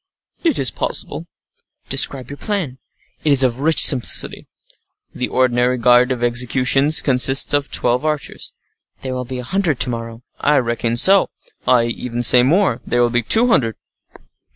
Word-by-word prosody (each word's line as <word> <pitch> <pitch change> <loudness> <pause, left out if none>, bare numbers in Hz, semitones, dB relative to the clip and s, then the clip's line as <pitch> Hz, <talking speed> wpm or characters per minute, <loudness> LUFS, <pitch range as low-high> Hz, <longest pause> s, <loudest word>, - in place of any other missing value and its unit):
"It 330 -6 0
is 130 - 0
possible." - - -2 0.6
"Describe 130 -1 +1
your 140 - -9
plan." 170 -12 -4 0.4
"It 150 - +1
is 135 -1 +5
of 125 -1 -1
rich 160 +3 +3
simplicity. 130 -4 +1 0.7
The 125 - -3
ordinary 125 0 0
guard 125 +1 +3
at 120 -2 -4
executions 130 +5 +1
consists 135 +1 +1
of 145 0 0
twelve 125 +3 0
archers." 155 -2 -5 0.5
"There 130 -1 -5
will 125 0 -5
be 130 +1 -7
a 125 - -6
hundred 170 0 -2
to 125 - 0
morrow." 115 0 -8 0.2
"I 150 0 +1
reckon 115 -1 -2
so. 195 +9 +3 0.4
I 125 -2 +3
even 120 +1 -4
say 125 +1 +5
more—there 130 - 0
will 120 - 0
be 120 0 0
two 225 - +3
hundred." 115 - 0
125 Hz, 155 wpm, -17 LUFS, 120-145 Hz, 0.7 s, is